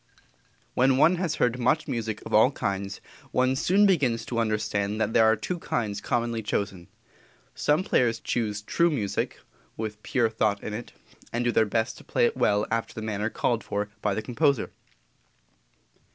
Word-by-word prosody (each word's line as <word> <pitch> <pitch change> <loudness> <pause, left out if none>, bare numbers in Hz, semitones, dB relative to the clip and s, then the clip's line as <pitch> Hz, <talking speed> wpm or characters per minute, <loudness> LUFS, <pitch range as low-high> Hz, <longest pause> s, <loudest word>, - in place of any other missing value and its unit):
When 130 +1 +3
one 170 +6 +5
has 170 -4 -1
heard 125 +1 +1
much 155 +6 +1
music 110 -2 -3
of - - -7
all 110 +4 +6
kinds, 100 -6 -3 0.3
one 130 +1 +2
soon 195 +9 +3
begins 135 - +2
to 115 - -2
understand 105 -2 -1
that 110 - 0
there 110 - +5
are 110 0 +5
two 175 +11 -4
kinds 105 -9 -2
commonly 115 -1 -1
chosen. 100 -4 -3 0.7
Some 150 +5 +1
players 115 -9 +2
choose 105 -3 -2
true 170 +10 +2
music 110 -11 -2 0.4
with 105 -1 -5
pure 120 -5 +1
thought 110 -2 0
in 105 - -4
it, 115 +3 -7 0.4
and 120 +1 -1
do 120 - +3
their 110 - +3
best 115 +4 -1
to - - -14
play 485 - +1
it 470 - 0
well 105 0 +2
after 115 0 -2
the 110 - -5
manner 105 0 -2
called 115 -1 -1
for 105 +1 -3
by 100 -2 0
the 110 - -3
composer. 140 0 +1
115 Hz, 175 wpm, -26 LUFS, 105-130 Hz, 0.7 s, all